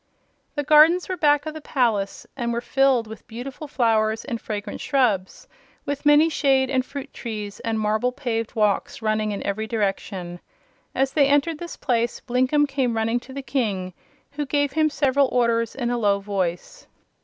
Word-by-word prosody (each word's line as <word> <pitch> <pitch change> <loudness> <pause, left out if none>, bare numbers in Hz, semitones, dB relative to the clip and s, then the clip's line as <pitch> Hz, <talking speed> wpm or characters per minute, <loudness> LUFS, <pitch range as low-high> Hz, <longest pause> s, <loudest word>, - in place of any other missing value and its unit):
The 290 - -1
gardens 310 +4 +6
were 370 - -2
back 295 -3 +3
of 310 - -4
the 315 - -8
palace 225 -9 0
and 240 -3 -2
were 235 - -1
filled 260 -1 +2
with 220 0 -11
beautiful 255 +6 -7
flowers 225 -4 +1
and 235 -5 -4
fragrant 205 -1 -5
shrubs, 220 -9 0 0.4
with 285 0 -2
many 295 +2 +6
shade 270 -4 +2
and 260 -1 +2
fruit 280 +1 -8
trees 210 -4 -6
and 225 -1 -2
marble 215 +3 +1
paved 240 -4 -3
walks 210 +1 0
running 215 -1 0
in 200 - -5
every 215 +2 -2
direction. 195 -5 -3 0.6
As 270 0 +1
they 280 -2 +4
entered 290 +3 +2
this 345 -1 -7
place 240 -2 0
Blinkem 260 +4 +2
came 260 -4 -1
running 225 +2 +1
to 255 - -14
the 275 +1 -6
King, 200 -10 -2 0.4
who 290 0 -4
gave 285 0 +1
him 310 +1 +2
several 280 -1 +2
orders 230 -2 +1
in 245 -3 -2
a 240 - -1
low 200 -2 +2
voice. 195 - -4
245 Hz, 175 wpm, -23 LUFS, 220-280 Hz, 0.6 s, gardens